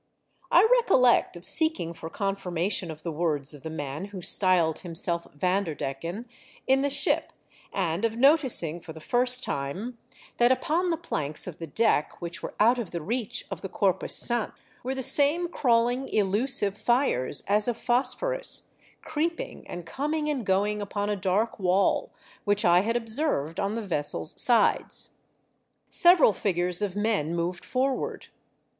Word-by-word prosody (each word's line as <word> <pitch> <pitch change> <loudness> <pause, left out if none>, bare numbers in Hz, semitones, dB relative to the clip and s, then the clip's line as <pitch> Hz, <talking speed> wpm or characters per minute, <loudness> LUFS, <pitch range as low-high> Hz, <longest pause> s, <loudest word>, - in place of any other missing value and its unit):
I 365 +6 +6
recollect 255 - +3
of 175 - -13
seeking 315 - +1
for 165 -1 -8
confirnration 190 -1 -2
of 155 -1 -9
the 170 - -3
words 150 -3 -1
of 145 - -12
the 160 - -6
man 145 +2 -5
who 200 -2 -9
styled 175 -3 +3
himself 170 -1 -1
Vanderdecken, 170 - -2 0.4
in 265 +1 +3
the 285 - +1
ship, 275 0 +1 0.4
and 175 -1 -2
of 230 0 0
noticing, 255 - +3
for 160 - -10
the 160 - -11
first 250 +8 +2
time, 195 - -4 0.4
that 240 +1 +4
upon 330 +7 0
the 330 - 0
planks 155 - -4
of 180 -4 -8
the 165 - -6
deck 215 -2 0
which 170 0 -6
were - - -7
out 235 +4 +4
of 220 -7 -4
the 170 - -4
reach 225 +7 -3
of - - -5
the 195 - -6
co7'pus 190 -2 0
sant, 240 -2 -1 0.3
were 260 +2 -3
the 265 - -3
same 300 +7 +3
crawling, 245 -4 +1
elusive 205 0 +2
fires, 240 - 0
as 210 +3 +4
of 240 -2 -1
phosphorus, - - 0 0.3
creeping 320 +2 -4
and 175 -1 -7
coming 300 - -2
and 255 -7 -4
going 205 +2 +1
upon 205 0 -3
a - - 0
dark 200 +4 -1
wall, 185 +1 +1 0.3
which 205 +1 +1
I 175 0 +6
had 230 +4 -1
observed 225 - -1
on 200 +2 -1
the 230 - -3
vessel's 145 - -2
sides. 240 -2 +2 0.8
Several 345 - +5
figures 180 -1 +1
of 200 -3 -2
men 205 -7 0
moved 175 +1 -3
forward. 265 +1 -2
205 Hz, 155 wpm, -26 LUFS, 170-250 Hz, 0.8 s, I